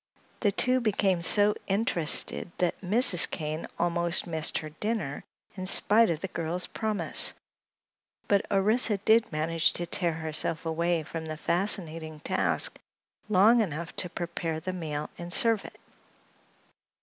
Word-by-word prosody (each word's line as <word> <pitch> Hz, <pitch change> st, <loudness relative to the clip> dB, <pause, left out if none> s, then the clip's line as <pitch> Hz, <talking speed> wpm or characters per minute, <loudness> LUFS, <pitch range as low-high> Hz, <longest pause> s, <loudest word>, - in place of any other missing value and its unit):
The 205 Hz, -, +1 dB
two 255 Hz, +6 st, +3 dB
became 200 Hz, -5 st, 0 dB
so 205 Hz, +4 st, +4 dB
interested 190 Hz, -5 st, 0 dB
that 180 Hz, -1 st, -1 dB
Mrs. 200 Hz, -1 st, +5 dB
Kane 155 Hz, +1 st, -5 dB
almost 170 Hz, 0 st, +1 dB
missed 160 Hz, -3 st, -1 dB
her 155 Hz, -1 st, -6 dB
dinner 205 Hz, -4 st, -4 dB, 0.3 s
in 185 Hz, -1 st, -4 dB
spite 220 Hz, +3 st, +4 dB
of 165 Hz, -2 st, -2 dB
the 190 Hz, -, -3 dB
girl's 170 Hz, +2 st, +1 dB
promise; 215 Hz, -2 st, 0 dB, 0.9 s
but 200 Hz, -1 st, +2 dB
Orissa 210 Hz, +2 st, +2 dB
did 220 Hz, +3 st, +2 dB
manage 160 Hz, +1 st, +1 dB
to 175 Hz, -, -2 dB
tear 170 Hz, 0 st, -1 dB
herself 160 Hz, +1 st, -2 dB
away 165 Hz, 0 st, -1 dB
from 160 Hz, +1 st, -7 dB
the 155 Hz, 0 st, -6 dB
fascinating 165 Hz, -3 st, -1 dB
task -, -, +1 dB, 0.5 s
long 215 Hz, +4 st, +5 dB
enough 170 Hz, -4 st, -5 dB
to 180 Hz, -, -2 dB
prepare 170 Hz, -2 st, -4 dB
the 185 Hz, +3 st, -5 dB
meal 150 Hz, -4 st, -5 dB
and 175 Hz, 0 st, -7 dB
serve 225 Hz, +2 st, +1 dB
it. -, -, -13 dB
175 Hz, 135 wpm, -27 LUFS, 160-205 Hz, 0.9 s, Mrs